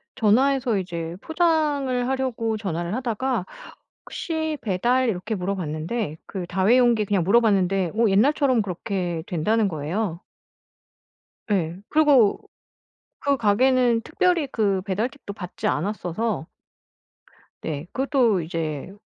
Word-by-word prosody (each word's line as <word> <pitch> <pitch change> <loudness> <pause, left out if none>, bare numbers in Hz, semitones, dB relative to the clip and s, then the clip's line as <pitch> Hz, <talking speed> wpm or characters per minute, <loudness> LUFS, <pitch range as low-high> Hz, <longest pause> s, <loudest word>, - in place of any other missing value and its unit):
전화해서 250 0 +2
이제 170 -2 -4
포장을 300 -7 +1
하려고 240 -4 -1
전화를 175 -3 -3
하다가 250 -3 -1 0.6
"혹시 315 -2 -3
배달?" 240 +6 +1
이렇게 215 +1 -2
물어봤는데 180 -1 -3
그 185 -3 -5
다회용기 220 +4 +3
그냥 195 -3 +1
물어봤는데 195 -3 +2
어 225 -2 +3
옛날처럼 255 +3 +3
그렇게 180 -3 -3
된다는 210 +5 +1
거예요. 170 +3 -3 1.3
예. 175 -3 0
그리고 285 -9 +4 0.8
그 280 0 +1
가게는 240 +2 +3
특별히 330 +3 +1
그 200 -6 +1
배달 210 +6 -1
팁도 260 -8 -10
받지 180 -3 -5
않았어서 190 +2 -2 1.1
네. 150 -1 -4
그것도 255 - +2
이제 160 0 -4
215 Hz, 265 characters per minute, -24 LUFS, 180-255 Hz, 1.3 s, 그리고